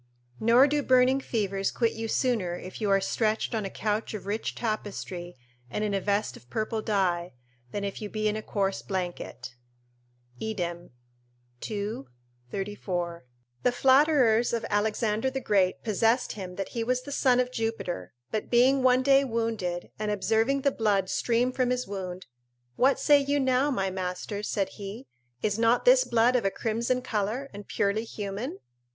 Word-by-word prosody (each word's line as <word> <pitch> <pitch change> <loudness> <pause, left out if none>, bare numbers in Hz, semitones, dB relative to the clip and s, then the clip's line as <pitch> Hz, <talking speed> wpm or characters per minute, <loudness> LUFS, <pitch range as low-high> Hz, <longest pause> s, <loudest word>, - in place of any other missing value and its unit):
["Nor 235 +4 +6
do 295 +1 +1
burning 255 0 +4
fevers 195 -5 -1
quit 230 -2 0
you 225 0 -4
sooner 220 -8 0
if 185 +4 -9
you 210 - +1
are 195 0 +5
stretched 215 +4 0
on 220 -3 -1
a - - -3
couch 215 +2 -2
of 200 - -7
rich 210 +3 -2
tapestry 195 - -4 0.3
and 210 - -2
in 210 -1 -1
a 195 - 0
vest 205 +2 0
of 120 - -16
purple 215 - -2
dye, 180 - 0 0.4
than 200 +9 -4
if 200 +1 -4
you 210 - -4
be 215 0 -1
in 210 - 0
a 215 - -3
coarse 195 -2 -1
blanket." 175 -9 -5 0.9
Idem, 175 -5 -3 0.8
ii. 210 -2 -3 0.5
34.] 180 -5 -4 0.4
The 250 - +3
flatterers 260 -3 +4
of 230 - -1
Alexander 215 +3 +1
the 265 0 -3
Great 195 -6 +1
possessed 225 +3 +2
him 185 -3 -7
that 195 0 -4
he 230 - -2
was 250 +2 0
the 285 - -8
son 255 -3 +3
of 250 0 +1
Jupiter; 225 - -3 0.2
but 215 - -2
being 255 +3 +4
one 255 0 +4
day 275 0 +5
wounded, 225 -8 -2
and 215 -1 -1
observing 225 +6 +1
the 280 - +2
blood 205 -6 +1
stream 240 +1 +1
from 255 -1 0
his 250 0 0
wound: 185 -2 -6 0.5
"What 270 +2 +3
say 290 -1 +6
you 285 +1 +1
now, 260 +1 +2
my 195 -8 0
masters," 185 +3 -4
said 195 -2 0
he, 205 +5 -8 0.4
"is 210 0 0
not 230 +1 +3
this - - +7
blood 235 +2 +3
of 250 - +2
a 195 - +2
crimson 235 +5 -1
colour 230 +4 -2
and 205 0 -9
purely 205 +2 0
human? 205 0 -5
215 Hz, 170 wpm, -28 LUFS, 195-250 Hz, 0.9 s, this